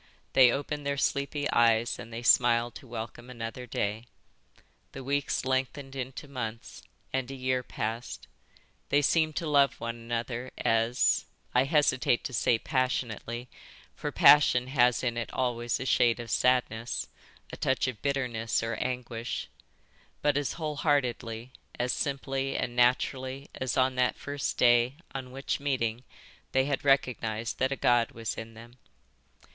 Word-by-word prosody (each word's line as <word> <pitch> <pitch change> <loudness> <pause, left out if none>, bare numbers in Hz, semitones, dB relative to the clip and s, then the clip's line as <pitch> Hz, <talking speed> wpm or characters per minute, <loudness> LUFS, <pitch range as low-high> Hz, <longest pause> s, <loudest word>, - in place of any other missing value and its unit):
They 125 -2 +7
opened 145 +2 -3
their 140 0 -1
sleepy 140 +1 0
eyes 115 0 +3
and 115 - -9
they 115 +1 -6
smiled 120 -1 +4
to 130 - -11
welcome 115 +1 -7
another 120 +1 -6
day. 110 +1 -2 0.9
The 135 - -7
weeks 140 0 -1
lengthened 135 +1 -2
into 130 +2 -6
months, 115 -5 -6 0.3
and 130 -1 -1
a 135 - -6
year 130 -1 0
passed. 115 0 -5 0.6
They 145 +1 +3
seemed 155 +1 +2
to 170 - -2
love 140 -2 +3
one 115 0 -4
another 120 +2 -4
as—I 115 +2 +1
hesitate 135 -5 +2
to 130 - -5
say 115 0 +3
passionately, 125 -2 -2 0.5
for - - -4
passion 140 -4 +6
has 125 -2 +3
in 120 -2 -1
it 115 - -3
always 120 -2 -1
a 130 - -4
shade 120 -2 +3
of 115 -2 -6
sadness, 125 -2 +1 0.5
a - - -3
touch 130 0 0
of 120 -5 -5
bitterness 125 -6 -1
or 115 0 -2
anguish, 120 -2 -4 0.7
but 145 -1 +3
as 145 -1 0
whole 155 -3 -4
heartedly, 125 -5 -1 0.3
as 125 +1 +1
simply 135 -1 -2
and 120 - -2
naturally 130 +2 +1
as 130 -2 -3
on 130 0 +3
that 125 0 +2
first 145 -1 -3
day 120 +1 +4 0.2
on 130 -2 -5
which, 135 +1 -3
meeting, 125 -4 -1 0.5
they 130 0 +3
had 140 -1 -1
recognised 120 -5 +1
that 130 +1 +1
a - - 0
god 120 -2 +2
was 115 -2 -3
in 115 0 -8
them." 120 +2 -14
125 Hz, 150 wpm, -29 LUFS, 115-135 Hz, 0.9 s, They